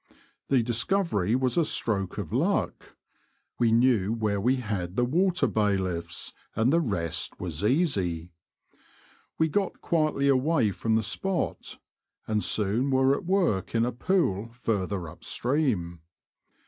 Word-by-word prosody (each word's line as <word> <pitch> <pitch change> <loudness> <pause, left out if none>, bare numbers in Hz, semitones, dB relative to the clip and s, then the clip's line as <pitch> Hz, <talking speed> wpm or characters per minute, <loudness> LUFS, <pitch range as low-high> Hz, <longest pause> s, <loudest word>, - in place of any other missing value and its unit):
The 130 -4 +3
dis 115 0 0
covery 130 - +1
was 130 +2 0
a 170 - +5
stroke 100 - -1
of - - -5
luck. - - -1 0.6
We 120 -2 +3
knew 115 -4 +3
where 105 -3 -1
we 125 +5 +3
had 100 -8 -4
the 125 - +2
water 180 +7 +2
bailiffs, 95 -5 -1 0.2
and 120 +6 +2
the 170 - +5
rest 85 - -3
was 85 -1 -4
easy. 100 - 0 1.1
We 160 - +3
got 195 +4 -1
quietly 155 -4 +1
away 135 -4 +3
from 110 +3 0
the 110 - +2
spot, 180 - -3 0.5
and 105 -1 0
soon 110 +6 +1
were 130 0 +3
at - - -6
work 170 - +1
in 115 0 +3
a 125 - -1
pool 120 - 0
further 100 -7 -2
up 75 - -12
stream. 120 - -1
115 Hz, 140 wpm, -27 LUFS, 100-140 Hz, 1.1 s, a